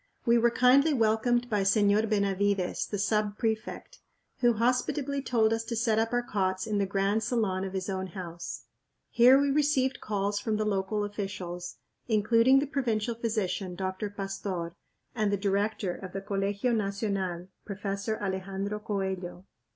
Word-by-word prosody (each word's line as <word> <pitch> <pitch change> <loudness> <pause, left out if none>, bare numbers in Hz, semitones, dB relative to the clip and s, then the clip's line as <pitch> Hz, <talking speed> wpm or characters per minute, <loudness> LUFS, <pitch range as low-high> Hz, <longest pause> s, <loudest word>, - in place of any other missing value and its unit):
We 235 0 +5
were 235 +1 +4
kindly 270 +6 +4
welcomed 240 +1 +2
by 210 -4 0
Señor 205 +2 +3
Benavides, 200 -2 0
the 205 - -3
sub 205 +1 0
prefect, 225 - -3 0.4
who 240 -2 +4
hospitably 255 +5 0
told 225 -4 +2
us 225 0 -1
to 230 0 -3
set 220 -1 +2
up 225 +1 0
our 245 0 +1
cots 190 -4 -1
in 210 -2 -1
the 200 - +1
grand 195 +2 +1
salon 210 -5 0
of 190 -1 -5
his 190 -1 -3
own 190 -1 -3
house. 170 -2 -7 0.5
Here 250 +3 +7
we 280 0 +2
received 275 -2 +1
calls 205 -1 -1
from 215 +1 -1
the 215 - 0
local 205 +1 0
officials, 185 -4 -5 0.3
including 230 +4 +4
the 275 - +2
provincial 240 -6 -1
physician, 210 -5 -2
Dr. 190 +3 -3
Pastór, 195 -3 -4 0.4
and 215 -3 0
the 200 - +1
director 200 -1 0
of 185 0 -9
the 195 - -4
Colegio 200 +4 -1
Nacional, 195 -4 -2
Professor 200 +2 -3
Alejandro 195 +1 -3
Coello. 190 -4 -4
205 Hz, 155 wpm, -29 LUFS, 195-230 Hz, 0.5 s, Here